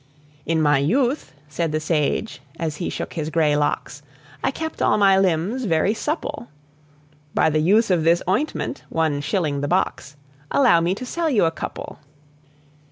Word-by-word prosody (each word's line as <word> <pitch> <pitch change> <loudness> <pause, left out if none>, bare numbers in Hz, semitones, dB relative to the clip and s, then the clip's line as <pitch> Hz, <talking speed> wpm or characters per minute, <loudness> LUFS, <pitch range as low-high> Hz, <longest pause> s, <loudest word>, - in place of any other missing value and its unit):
"In 160 0 +1
my 145 -2 +4
youth," 245 - 0 0.2
said 160 +2 -2
the 155 - 0
sage, 155 - -1 0.2
as 155 -3 -3
he 175 - -3
shook - - -5
his 155 -2 -3
gray 155 -2 +2
locks, 145 0 -2 0.4
"I - - +2
kept 320 0 -5
all - - +3
my 195 -2 +5
limbs 195 +7 0
very 170 +2 +2
supple 295 0 -4 0.9
By 160 - +3
the 155 - +1
use 205 +6 +3
of 170 -3 +2
this 170 +2 +3
ointment 275 +6 -1
one 155 -3 0
shilling 150 -2 -1
the 145 - -1
box 150 -4 -1 0.3
Allow 250 -11 +4
me 175 +3 +1
to 255 - -7
sell 335 +5 -1
you 220 - +3
a 165 - +2
couple." 165 - -7
170 Hz, 165 wpm, -22 LUFS, 155-220 Hz, 0.9 s, my